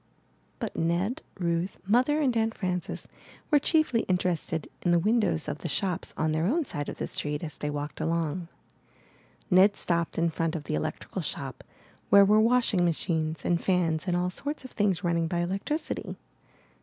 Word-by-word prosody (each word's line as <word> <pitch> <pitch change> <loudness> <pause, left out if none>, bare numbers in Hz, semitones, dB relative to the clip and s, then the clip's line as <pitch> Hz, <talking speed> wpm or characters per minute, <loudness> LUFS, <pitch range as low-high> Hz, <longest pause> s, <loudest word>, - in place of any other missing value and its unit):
But - - -4
Ned, 175 +9 0 0.2
Ruth, 170 0 -1
Mother, 255 +9 +3
and 260 -5 +2
Aunt 225 0 +1
Frances 180 -2 -3 0.4
were 295 - +6
chiefly 310 -5 +2
interested 175 -4 0
in 175 - 0
the 175 - +5
windows 205 -3 +2
of 150 0 -3
the - - -4
shops 180 +3 -1
on 155 0 +1
their 160 +2 +1
own 310 - +1
side 145 - -4
of - - -7
the - - -2
street, 150 +1 -3
as 155 -3 -6
they 150 - -3
walked 145 0 -4
along. 165 +1 -1 1.0
Ned 190 +3 +6
stopped 170 -1 0
in 165 0 +2
front 165 +1 -1
of 155 - -4
the - - -4
electrical 75 - -3
shop, - - -5 0.5
where 200 0 +8
were 210 +2 +5
washing 230 -5 +3
machines 160 -2 -1
and 170 -1 +2
fans 175 -2 +1
and 175 -1 +2
all 180 0 0
sorts 285 +7 -4
of 260 - -9
things 200 -3 +1
running 170 -1 +1
by 175 - -2
electricity. 195 - -3
175 Hz, 175 wpm, -28 LUFS, 165-210 Hz, 1.0 s, where